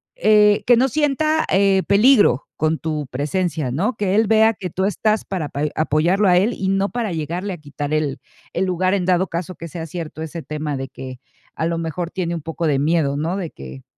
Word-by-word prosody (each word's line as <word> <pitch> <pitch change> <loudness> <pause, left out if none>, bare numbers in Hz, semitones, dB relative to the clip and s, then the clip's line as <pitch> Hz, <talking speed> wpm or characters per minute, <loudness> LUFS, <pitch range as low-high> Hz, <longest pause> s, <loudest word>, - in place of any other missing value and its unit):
eh, 210 - +4
que 245 - +6
no 255 +3 +3
sienta, 310 +3 +1
eh, 195 -1 +3
peligro 205 - +4
con 155 +1 0
tu 155 -2 -3
presencia, 150 0 -2
¿no? 200 - -1
Que 200 -2 0
él 220 +2 +4
vea 220 +1 +4
que 190 -3 -6
tú 190 +1 -1
estás 215 +2 0
para 180 -6 -3
apa 145 0 -5
apoyarlo 165 +6 +2
a 180 -1 +5
él 215 +6 +2
y 190 - -3
no 195 +1 +1
para 235 -5 -3
llegarle 170 +5 -3
a 175 - -7
quitar 145 0 -5
el 150 -3 -1 0.3
el 185 - 0
lugar, 185 +1 0
en 180 -3 -1
dado 185 +1 +2
caso 170 +2 -4
que 170 - -8
sea 165 +1 -6
cierto 160 -1 -7
ese 165 +1 -6
tema 150 -2 -4
de 135 0 -4
que, 130 0 -9 0.4
a 160 - -1
lo 170 - -1
mejor, 165 +1 -3
tiene 175 -2 -2
un 165 - -5
poco 165 +2 -4
de 140 -2 +2
miedo, 145 -2 +1
¿no? 165 +6 -2
De 175 -5 -4
que 65 0 -10
175 Hz, 220 wpm, -20 LUFS, 155-200 Hz, 0.4 s, que